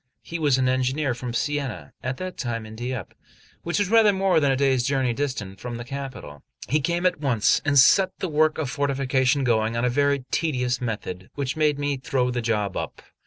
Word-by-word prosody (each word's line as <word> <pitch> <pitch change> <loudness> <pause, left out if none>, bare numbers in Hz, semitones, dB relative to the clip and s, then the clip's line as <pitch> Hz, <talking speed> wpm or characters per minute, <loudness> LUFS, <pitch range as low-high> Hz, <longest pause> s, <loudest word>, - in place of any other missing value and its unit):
He 170 - -5
was 145 -4 +3
an 130 -1 +2
engineer 130 +2 +1
from 125 0 -5
Siena, 140 -3 -3
at 130 +1 -3
that 185 0 -5
time 115 -3 -3
in 110 0 -10
Dieppe, 120 -3 -5 0.5
which 175 +4 -1
is 205 -1 0
rather 225 -2 +6
more 190 -3 +2
than 140 -3 +2
a - - +2
day's 130 -2 +2
journey 130 -2 +1
distant 115 -8 -4
from 120 +2 -6
the 120 - -6
capital. 125 - -7 0.3
He 150 - +2
came 175 +4 -1
at 180 -4 +2
once, 125 -8 +2
and 145 -1 +2
set 185 +8 +6
the 185 - -2
work 155 -1 +2
of 160 -3 -2
fortification 135 0 +1
going 115 -2 +1
on 120 - +1
a - - +2
very 140 0 +1
tedious 125 -6 0
method, 100 -6 -5
which 135 -2 -2
made 150 -2 +2
me 145 -1 -1
throw 125 0 0
the 120 0 -2
job 105 -4 -1
up. - - -5
130 Hz, 210 wpm, -24 LUFS, 120-145 Hz, 0.5 s, rather